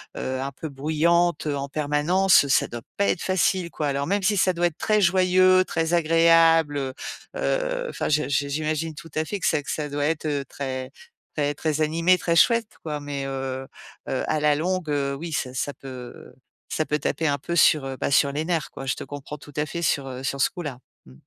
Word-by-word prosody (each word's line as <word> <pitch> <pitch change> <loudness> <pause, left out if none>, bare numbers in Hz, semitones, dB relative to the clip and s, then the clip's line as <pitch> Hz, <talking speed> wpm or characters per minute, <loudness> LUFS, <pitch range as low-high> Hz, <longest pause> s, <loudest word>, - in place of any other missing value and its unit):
heu, 130 0 -3
un 140 - -3
peu 150 +4 -7
bruyante, 160 +3 +1
heu, 145 -1 -1
en 140 0 -4
permanence, 150 +5 +3
ça - - +3
doit 120 -1 -7
pas 200 - +2
être 175 - 0
facile 185 -2 +1
quoi. 150 - -2
Alors 140 0 -1
même 200 +2 0
si 205 +2 +2
ça 185 0 +3
doit 175 0 +2
être 165 - -7
très 215 -1 +2
joyeux, 185 0 +4
très 165 +1 0
agréable, 165 -2 +4
heu 135 -2 -3 0.4
heu, - - -1
enfin - - -3
je 150 -3 +1
j'i 140 +1 +1
j'imagine 155 +2 -2
tout 165 +2 -11
à 155 - 0
fait 205 +4 -4
que - - 0
ça 150 -2 +1
que - - -4
ça 150 -1 -3
doit 145 0 -1
être, 155 0 -1
heu, 145 -2 -1
très 130 -1 -5 0.4
très 145 -1 0
très 155 0 -1
animé 165 +4 +3
très 170 -1 0
chouette 230 +3 +3
quoi 150 -2 -3
mais, 145 -1 -5
heu 135 -1 -4 0.4
heu, 130 - -1
à 155 - +1
la 150 0 +3
longue, 180 +1 -1
heu, 140 -1 0
oui 160 +3 -6
ça 130 - -2
ça 145 +2 -2
peut 130 -2 -10 0.4
ça 155 - -1
peut 150 - +1
taper 150 +2 -1
un 140 -1 +1
peu 170 +5 -4
sur, 155 -4 +5
heu, 135 -1 -5
bah, - - -1
sur 140 0 +3
les 150 +3 -2
nerfs 165 -3 -1
quoi. 135 - -8
Je - - +1
te - - -7
comprends 145 +1 -8
tout 145 +1 -14
à 150 0 0
fait 170 +2 -4
sur, 140 -4 +1
heu, 130 0 -7
sur 140 0 -2
ce - - +4
coup 180 -3 -7
là. 135 -5 -6 0.3
Mmh. 65 - -15
155 Hz, 230 wpm, -24 LUFS, 140-170 Hz, 0.4 s, sur